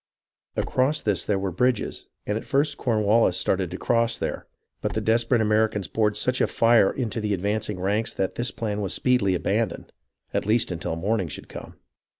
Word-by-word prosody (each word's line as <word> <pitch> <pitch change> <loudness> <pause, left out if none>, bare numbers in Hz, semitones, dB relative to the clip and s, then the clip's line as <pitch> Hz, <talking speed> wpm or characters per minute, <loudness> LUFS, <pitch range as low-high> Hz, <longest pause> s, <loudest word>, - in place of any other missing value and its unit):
Across 140 +4 +1
this 100 -5 0
there 105 - +1
were 95 -1 -2
bridges, 125 +5 -1 0.2
and 105 - -1
at 110 - -3
first 145 +1 +1
Cornwallis 110 -5 +2
started 95 -2 0
to 90 - -6
cross 115 +1 +1
there; - - -4 0.3
but - - -2
the - - 0
desperate 115 +1 +2
Americans 105 -3 +1
poured 105 +3 0
such 125 +4 0
a - - +3
fire 115 -4 +4
into 115 -3 -3
the 105 -1 0
advancing 105 +1 -2
ranks 105 +5 0
that 95 - -1
this 120 +1 -2
plan 105 -2 -3
was 95 - -1
speedily 120 -7 +2
abandoned, 105 +3 -2 0.4
at - - -1
least 110 -2 +2
until 85 -1 -3
morning 95 +2 0
should 75 - -8
come. - - -9
105 Hz, 180 wpm, -25 LUFS, 95-115 Hz, 0.4 s, fire